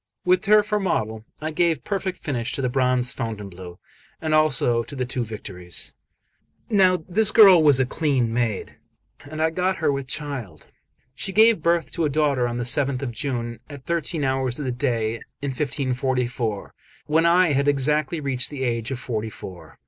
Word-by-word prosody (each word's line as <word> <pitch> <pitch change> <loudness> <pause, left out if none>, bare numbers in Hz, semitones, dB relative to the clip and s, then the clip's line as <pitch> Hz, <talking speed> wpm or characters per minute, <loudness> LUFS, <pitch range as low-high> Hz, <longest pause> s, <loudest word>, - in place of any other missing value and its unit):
With 185 +3 +3
her 210 +1 +6
for 210 0 -1
model, 110 - -2
I 155 +1 -3
gave 160 -4 +1
perfect 190 -2 -3
finish 125 -3 -3
to - - -2
the 125 - +1
bronze 125 -1 +1
Fontainebleau, 100 -6 -6 0.4
and 155 -1 -2
also 135 -6 +3
to 145 - -9
the 130 -2 -2
two 125 0 -2
Victories. 95 -5 -7 0.8
Now 185 -4 +4
this 205 +4 +1
girl 195 -6 +8
was 145 -4 +5
a 130 - +3
clean 130 -4 0
maid, 115 -5 -2 0.5
and 155 +1 -7
I 160 +1 +2
got 185 +3 0
her 155 -5 +1
with 140 -1 -3
child. 130 - -5 0.5
She 195 +8 -4
gave 220 -2 +5
birth 170 +1 +1
to 165 - 0
a - - +1
daughter 140 -4 +1
on 120 0 -3
the 120 - -2
7th 135 +1 0
of 125 - -3
June, 120 -1 -4
at 140 -3 -10
thirteen 170 -2 -2
hours 130 -2 0
of 145 - -4
the 130 - -1
day, 120 -3 -1 0.2
in 140 -1 -3
1544, 130 -5 -2 0.3
when 160 +2 +3
I 175 -1 +4
had 140 +1 +1
exactly 150 +3 +1
reached 135 -4 -1
the 140 -3 -5
age 115 -2 -1
of 135 - -3
forty 110 -3 -3
four. 95 -4 -11
135 Hz, 180 wpm, -23 LUFS, 120-160 Hz, 0.8 s, girl